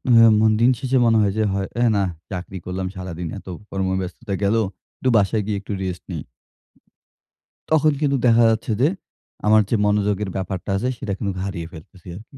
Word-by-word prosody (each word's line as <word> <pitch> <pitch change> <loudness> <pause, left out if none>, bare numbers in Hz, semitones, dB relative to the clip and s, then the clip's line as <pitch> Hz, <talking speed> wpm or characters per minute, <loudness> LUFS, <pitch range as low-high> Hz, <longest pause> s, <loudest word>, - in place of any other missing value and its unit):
হা 115 0 +8
মন 110 - +5
দিন 125 - +6
শেষে 130 0 +1
মনে 115 -1 +4
হয় 100 -2 +2 0.5
হে 120 - +4
না 100 - +2 0.3
চাকরি 95 +1 -5
করলাম 95 +1 -3
সারাদিন, 90 -2 -5
এত - - -19 0.2
কর্মব্যস্ততা 95 +2 -3
গেল, 100 +3 +3 0.4
একটু 130 - +1
বাসায় 105 +1 +2
গিয়ে 105 -1 -1
একটু 100 - -5
রেস্ট 90 -2 -4
নিই। 80 -4 -4 1.5
তখন 155 -1 +4
কিন্তু 140 -2 +2
দেখা 115 0 +5
যাচ্ছে 110 +1 -1
যে, 145 - +5 0.6
আমার 110 0 +6
যে - - +2
মনোযোগের 105 -1 +1
ব্যাপারটা 95 0 -4
আছে 125 +6 -1
সেটা 110 -6 -3
কিন্তু 100 -2 -2
হারিয়ে 85 -4 -4
ফেলতেছি 85 +3 -14
আরকি। 115 +6 -14
100 Hz, 170 wpm, -22 LUFS, 95-115 Hz, 1.5 s, হা